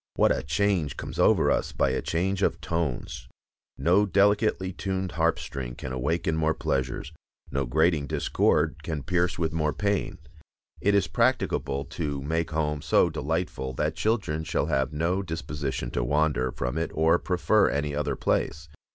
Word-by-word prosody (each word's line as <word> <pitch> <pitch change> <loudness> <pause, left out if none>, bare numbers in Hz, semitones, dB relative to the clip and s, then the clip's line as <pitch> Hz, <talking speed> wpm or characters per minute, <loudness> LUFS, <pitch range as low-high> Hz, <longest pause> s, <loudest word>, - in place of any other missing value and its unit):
What - - +4
a - - -2
change 95 -9 0
comes - - -6
over - - +4
us - - 0
by - - +2
a - - -1
change 95 +3 -1
of 85 -3 +1
tones! 85 -6 -3 0.5
No 90 +9 +3
delicately 100 0 +2
tuned 95 0 -3
harp 85 -1 +1
string 65 -3 -6
can 65 - -6
awaken 80 +5 0
more 80 0 +1
pleasures, 65 +3 -2 0.4
no 70 -1 -1
grating 80 +2 +2
discord 75 - +1
can 75 -3 -4
pierce 90 0 0
with 80 -1 -1
more 75 -2 0
pain. 100 -2 -1 0.6
It 100 +1 +2
is 100 -3 +3
practicable 70 -3 0
to 75 -4 -3
make 80 +3 -1
home 75 -2 -1
so - - +3
delightful 75 -5 -2
that 75 +4 -1
children 100 -9 0
shall 80 - 0
have 70 -3 0
no 85 +5 0
disposition 75 -8 -4
to - - -1
wander 70 -1 +1
from 60 +7 -3
it 85 - -1
or 80 +2 +4
prefer 100 +3 +2
any 75 0 -1
other 70 -1 -1
place. 80 +4 -1
80 Hz, 160 wpm, -27 LUFS, 70-90 Hz, 0.6 s, What